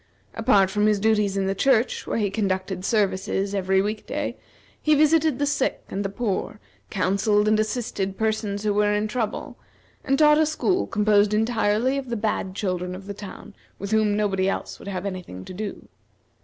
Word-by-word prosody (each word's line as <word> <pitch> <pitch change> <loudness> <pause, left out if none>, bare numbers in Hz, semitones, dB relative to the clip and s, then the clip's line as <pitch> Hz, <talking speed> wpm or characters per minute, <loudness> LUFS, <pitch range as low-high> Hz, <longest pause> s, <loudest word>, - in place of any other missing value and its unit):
Apart 200 -4 +3
from 210 0 +2
his 210 -1 +2
duties 210 -2 +2
in 195 - 0
the 195 - 0
church, 245 +3 +1
where - - -1
he 205 -3 0
conducted 190 -3 -2
services 195 -1 0
every 190 -1 +2
week 210 +1 -4
day, - - -3 0.5
he 305 0 +4
visited 310 -1 +3
the 285 - 0
sick 285 -2 -1
and 200 +1 -3
the 195 - -2
poor, 210 0 -3 0.3
counselled 200 +2 +1
and 215 0 +3
assisted 215 -4 -2
persons 215 -2 -1
who 210 -1 +1
were 210 0 +2
in 210 +1 0
trouble, 220 -1 -4 0.4
and 275 - +1
taught 300 0 +6
a 315 - +4
school 365 +5 0
composed 210 0 +3
entirely 225 +3 +1
of 260 -2 -8
the 235 - -2
bad 205 -3 -2
children 180 -2 -2
in 190 +1 -10
the 200 - -5
town 205 0 -10 0.2
with 200 +1 -6
whom 215 -1 +2
nobody 195 -2 +1
else - - -4
would - - -11
have 190 -1 -4
any 185 -2 -3
thing 95 - -10
to - - -8
do. 205 +2 -6
210 Hz, 190 wpm, -24 LUFS, 195-220 Hz, 0.5 s, taught